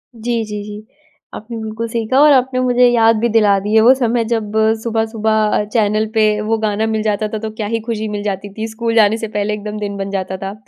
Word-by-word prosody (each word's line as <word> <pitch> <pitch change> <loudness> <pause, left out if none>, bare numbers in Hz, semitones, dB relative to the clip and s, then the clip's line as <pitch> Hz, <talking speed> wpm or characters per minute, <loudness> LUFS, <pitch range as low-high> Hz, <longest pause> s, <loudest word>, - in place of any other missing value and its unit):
जी, 230 0 -2
जी, 210 -1 -6
जी 210 +1 -9 0.5
आपने 230 +2 -8
बिल्कुल 220 +1 -4
सही 230 0 -3
कहा 260 +4 +2
और 300 0 +7
आपने 255 -1 +1
मुझे 250 0 +3
याद 230 -1 +4
भी 235 +2 +1
दिला 210 -3 +3
दी 205 +2 -4
है 220 - +6
वो 240 +4 +7
समय 240 -3 0
जब 220 -2 -2 0.3
सुबह-सुबह 220 -2 0
चैनल 215 -1 +1
पे 220 -2 +3 0.2
वो 220 +1 0
गाना 215 0 -1
मिल 220 -1 -1
जाता 215 0 -1
था 220 - -1
तो 220 0 -5
क्या 215 -2 -3
ही 230 +2 -1
खुशी 220 -2 -3
मिल 205 0 -4
जाती 200 0 -4
थी, 220 +2 -4
स्कूल 230 +1 -3
जाने 220 -1 +4
से 225 - -4
पहले 210 0 -2
एकदम 210 0 -5
दिन 200 -1 -4
बन 195 0 -4
जाता 190 -1 -3
था। 195 +1 -6
220 Hz, 235 wpm, -17 LUFS, 210-230 Hz, 0.5 s, और